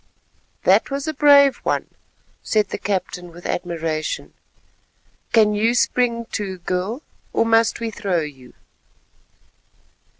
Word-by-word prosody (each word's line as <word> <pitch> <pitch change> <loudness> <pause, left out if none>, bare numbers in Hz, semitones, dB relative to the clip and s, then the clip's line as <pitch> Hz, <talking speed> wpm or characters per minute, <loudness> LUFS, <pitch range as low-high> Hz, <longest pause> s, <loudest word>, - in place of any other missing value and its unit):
"That - - +4
was 275 +2 -3
a 315 - -1
brave 285 -2 +6
one," - - -2 0.5
said 210 -2 +1
the - - -5
captain 180 -2 -3
with 175 +1 -14
admiration. 165 -3 -3 1.0
"Can 215 -2 +4
you 225 +3 +1
spring 240 -1 +1
too, 195 -3 -3
girl, 185 - -3 0.3
or - - +2
must 225 0 +3
we 230 -1 -3
throw 195 -5 -1
you?" 135 -5 -9
210 Hz, 120 wpm, -21 LUFS, 175-235 Hz, 1.0 s, brave